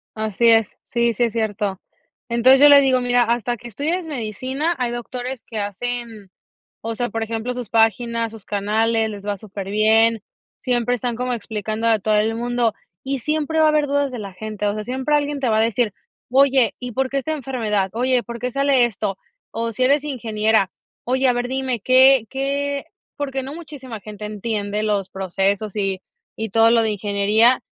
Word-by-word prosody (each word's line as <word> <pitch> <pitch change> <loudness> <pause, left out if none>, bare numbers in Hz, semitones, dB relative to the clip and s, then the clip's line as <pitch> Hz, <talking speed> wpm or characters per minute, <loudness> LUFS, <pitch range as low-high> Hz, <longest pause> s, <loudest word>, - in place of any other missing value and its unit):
Así 220 +2 +1
es, 225 -2 +3
sí, 235 -1 0
sí 235 - 0
es 235 -1 0
cierto. 205 -3 -2 0.5
Entonces, 255 +3 +5
yo 290 - +9
le 285 -1 +9
digo, 260 -2 +3
mira, 245 0 +3
hasta 240 +1 -1
que 240 - -11
estudies 320 - -2
medicina, 265 - -3
hay 245 -2 -1
doctores 245 +1 -5
que 225 - -8
hacen, 220 0 -5 0.5
o 230 0 -3
sea, 240 +1 -2
por 225 +1 -3
ejemplo, 225 +2 -3
sus 245 -4 -6
páginas, 230 0 +1
sus 220 -4 -12
canales, 220 +2 0
les 205 -1 -9
va 205 -1 -1
superbién, 215 +3 +1 0.4
siempre 245 -1 0
están 245 0 -2
como 250 +1 -2
explicando 220 0 -3
a 225 -1 +4
todo 215 +1 0
el 220 +2 +1
mundo, 240 -1 0 0.3
y 270 0 -2
siempre 310 +4 -1
va 315 - +6
a - - +6
haber 305 -1 +2
dudas 285 0 0
de 245 - -5
la 200 -2 -7
gente, 210 +2 -5
o 205 - +1
sea, 215 - -4
siempre 260 +6 -1
alguien 290 -1 0
te 260 - 0
va 220 - +2
a - - +4
decir, 230 -1 +1 0.4
oye, 265 -1 +4
¿y 250 -1 -5
por 265 +3 -1
qué 275 - 0
esta 315 +4 -3
enfermedad? 225 -9 -1
Oye, 250 +1 +1
¿por 235 0 -7
qué 250 +1 -3
sale 275 -1 +3
esto? 200 -3 -4 0.3
O 230 0 -3
si 240 - -3
eres 280 +2 +3
ingeniera, 220 -7 0 0.3
oye, 260 +2 +1
a 245 - +3
ver, 245 0 -2
dime, 260 -3 -2
¿qué, 260 0 +5
qué?, 280 +1 -2 0.3
porque 270 -2 -3
no 270 +3 -7
muchísima 285 -9 -9
gente 210 0 -9
entiende 210 0 -3
los 205 -3 -1
procesos 195 +2 -1
y 195 -2 -1 0.4
y 220 0 -3
todo 225 +3 +5
lo 230 -1 +4
de 220 - 0
ingeniería, 210 +4 +2
235 Hz, 190 wpm, -21 LUFS, 215-260 Hz, 0.5 s, yo